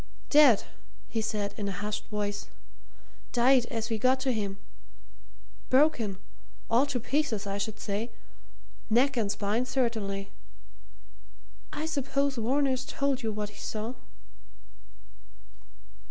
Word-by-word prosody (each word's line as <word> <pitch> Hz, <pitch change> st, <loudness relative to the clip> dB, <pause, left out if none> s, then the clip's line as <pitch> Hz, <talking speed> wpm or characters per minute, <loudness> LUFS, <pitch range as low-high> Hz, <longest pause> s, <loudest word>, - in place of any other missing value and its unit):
"Dead!" 290 Hz, -8 st, +7 dB, 0.5 s
he 225 Hz, -, -1 dB
said 210 Hz, -2 st, -2 dB
in 205 Hz, -2 st, -2 dB
a -, -, -2 dB
hushed 205 Hz, +2 st, -4 dB
voice. 205 Hz, -1 st, -3 dB, 0.9 s
"Died 245 Hz, 0 st, +5 dB
as 230 Hz, -1 st, -3 dB
we 220 Hz, -, 0 dB
got 260 Hz, +3 st, +3 dB
to 260 Hz, -1 st, +1 dB
him. 200 Hz, -4 st, -2 dB, 1.1 s
Broken 255 Hz, -8 st, +3 dB, 0.5 s
all 245 Hz, +5 st, +4 dB
to 275 Hz, -3 st, -1 dB
pieces, 245 Hz, -4 st, 0 dB
I 200 Hz, 0 st, -2 dB
should 215 Hz, +1 st, -3 dB
say 210 Hz, +3 st, -2 dB, 0.8 s
neck 260 Hz, +5 st, +4 dB
and 215 Hz, -4 st, +1 dB
spine 215 Hz, +5 st, 0 dB
certainly. 220 Hz, -6 st, -1 dB, 1.4 s
I 300 Hz, +1 st, -3 dB
suppose 280 Hz, -3 st, 0 dB
Varner's 260 Hz, +2 st, +1 dB
told 275 Hz, 0 st, -1 dB
you 225 Hz, -2 st, -1 dB
what 210 Hz, -1 st, -3 dB
he 205 Hz, -, -14 dB
saw." 220 Hz, +3 st, -4 dB
230 Hz, 120 wpm, -29 LUFS, 210-265 Hz, 1.4 s, Dead